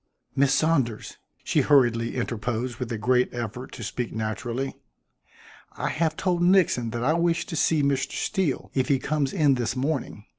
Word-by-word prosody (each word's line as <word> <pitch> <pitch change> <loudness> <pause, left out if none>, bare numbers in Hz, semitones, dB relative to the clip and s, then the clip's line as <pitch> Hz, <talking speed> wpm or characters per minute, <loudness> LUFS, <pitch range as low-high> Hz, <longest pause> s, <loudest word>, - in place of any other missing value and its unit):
"Miss 140 -1 +3
Saunders," 135 -6 0 0.2
she - - +2
hurriedly 120 -5 +3
interposed 120 0 -2
with 125 -2 -4
a 115 - -2
great 125 +3 +2
effort 120 +2 -5
to 115 - -7
speak 120 +2 -3
naturally, 115 +4 -3 1.0
"I - - -1
have 160 0 0
told 180 -2 0
Nixon 175 -10 +3
that 120 +1 -3
I 150 +5 +3
wish 170 0 +1
to 165 - -6
see 155 -1 +2
Mr. 140 -1 0
Steele 190 -10 -1
if 130 -2 +1
he 140 - +3
comes 140 +1 -1
in 150 -7 +3
this 120 -1 -1
morning. 135 +1 -2
130 Hz, 170 wpm, -25 LUFS, 120-155 Hz, 1.0 s, Miss